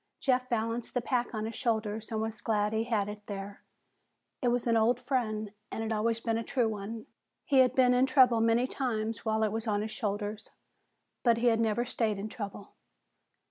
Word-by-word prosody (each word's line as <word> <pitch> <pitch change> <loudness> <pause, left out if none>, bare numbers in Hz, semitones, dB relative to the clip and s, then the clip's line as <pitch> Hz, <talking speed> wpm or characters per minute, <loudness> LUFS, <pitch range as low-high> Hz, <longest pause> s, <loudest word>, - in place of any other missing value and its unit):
Jeff 255 -1 +1
balanced 230 +1 -2
the - - +3
pack 245 0 -1
on 215 0 -2
his 225 - -4
shoulders 220 -2 -2
and 220 - -1
was 220 0 -4
glad 210 -1 +1
he 220 +1 0
had 215 -4 0
it 210 0 -7
there. 200 0 -6 0.8
It 250 - +1
was 245 0 +1
an 230 -1 +3
old 225 +2 +3
friend 215 -6 -1 0.2
and 225 - -3
had 225 0 -1
always 225 +1 0
been 225 0 -1
a - - -3
true 245 -1 +1
one. 220 +1 -5 0.4
He 275 -4 +4
had 255 -1 +5
been 250 -1 +5
in 250 +1 +4
trouble 255 -3 +5
many 230 +2 +3
times 225 -4 -2
while 220 0 +1
it 215 - +1
was 225 +1 -3
on 205 -1 +1
his 220 - -5
shoulders, 210 -1 -3 0.7
but 235 -2 +4
he 240 +1 +3
had 225 - 0
never 230 +1 +1
stayed 225 -4 0
in 205 +2 -4
trouble. 205 -2 -7
225 Hz, 205 wpm, -30 LUFS, 215-240 Hz, 0.8 s, had